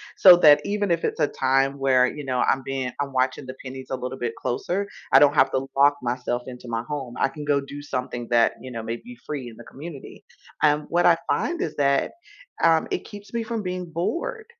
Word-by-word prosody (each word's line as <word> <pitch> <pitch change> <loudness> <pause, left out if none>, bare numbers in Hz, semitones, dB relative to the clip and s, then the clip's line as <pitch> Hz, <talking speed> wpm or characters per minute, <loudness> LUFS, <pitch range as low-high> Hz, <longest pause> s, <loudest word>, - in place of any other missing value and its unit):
So 180 -2 +9
that 150 -3 +7
even 205 -2 -1
if 170 -1 +1
it's - - -2
a 150 - +3
time 135 +1 +1
where, 130 -2 +3
you 150 +3 -6
know, 130 -2 -2
I'm 135 - +2
being 135 -1 -3
I'm 140 -1 -3
watching 130 +1 0
the 130 0 -8
pennies 130 0 -8
a 130 - -2
little 130 +1 -5
bit 120 -3 -3
closer, 190 +11 -2 0.2
I - - +8
don't 145 0 +5
have 135 -2 +4
to 130 0 -1
lock 140 +1 +5
myself 125 0 -2
into 125 -1 -9
my 115 0 -2
home. 135 -5 -5
I - - +3
can 150 +2 -8
go 145 -1 +2
do 140 +1 -8
something 125 -4 -5
that, 115 -1 +4
you 130 - -8
know, 115 -2 -5
may 115 +1 -4
be 245 - -12
free 135 -5 -5
in 115 - -14
the 120 - -12
community. 145 0 -10 0.4
Um, 150 0 +3
what 175 +1 +2
I 170 -1 +6
find 345 +1 0
is 385 - -3
that, 140 -1 +2 0.5
um, 165 -1 +4
it - - -2
keeps 205 0 -12
me 235 -1 -1
from 225 0 -3
being 180 -1 -4
bored. 435 - -3
140 Hz, 230 wpm, -24 LUFS, 130-170 Hz, 0.5 s, So